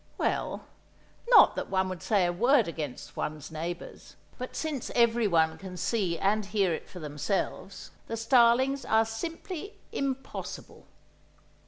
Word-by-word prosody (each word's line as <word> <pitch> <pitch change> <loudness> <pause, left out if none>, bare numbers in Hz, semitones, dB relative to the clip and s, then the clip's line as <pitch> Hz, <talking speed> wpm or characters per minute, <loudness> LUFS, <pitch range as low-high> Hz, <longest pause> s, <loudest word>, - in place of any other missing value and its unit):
—well—not 480 - +1
that - - -4
one 190 -1 +1
would 185 -2 -5
say 200 -5 +2
a 175 - 0
word 240 +4 +4
against 155 -6 -6
one's 155 0 -4
neighbours, 170 +2 -6 0.2
but 255 - -6
since 300 -6 -3
everyone 215 -9 +3
can 185 -2 -8
see 180 -3 0
and 205 +3 +1
hear 200 -4 +1
it - - -6
for - - -11
themselves, 180 +5 -3 0.2
the 230 - -3
starlings 250 +3 +4
are 220 0 +3
simply 330 - -6 0.2
"impossible." 270 -1 -5
210 Hz, 130 wpm, -29 LUFS, 175-245 Hz, 0.2 s, word